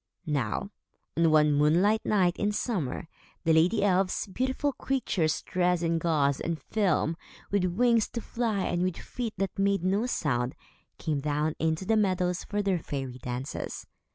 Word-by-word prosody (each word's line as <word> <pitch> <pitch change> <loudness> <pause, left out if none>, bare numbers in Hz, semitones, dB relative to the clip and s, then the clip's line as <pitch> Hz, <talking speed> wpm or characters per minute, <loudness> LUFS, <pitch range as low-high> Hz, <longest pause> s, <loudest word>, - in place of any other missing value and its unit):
Now, 145 - -1 0.4
on 165 0 +4
one 150 -1 +5
moonlight 175 +10 +3
night 185 -4 +3
in 205 - +1
summer, 170 - -2 0.4
the 165 -1 +3
lady 170 +7 +3
elves, 190 -1 +2
beautiful 260 +7 -1
creatures, 230 - -1
dressed 180 -1 +1
in 165 0 +1
gauze 145 -5 +1
and 165 -2 -2
film, 180 -6 0 0.4
with 200 -2 +2
wings 235 -2 +3
to 235 - -3
fly 225 -5 -1
and 175 - 0
with 185 -1 0
feet 235 -3 -5
that 195 +1 -2
made 195 -2 +2
no 200 +6 +1
sound, 130 - -1 0.4
came 155 -4 -1
down 150 +2 0
into 160 +3 0
the 220 +2 +3
meadows 180 -3 +1
for 205 0 -2
their 190 -3 +1
fairy 135 -4 -5
dances. 125 +2 -5
180 Hz, 155 wpm, -28 LUFS, 155-205 Hz, 0.4 s, one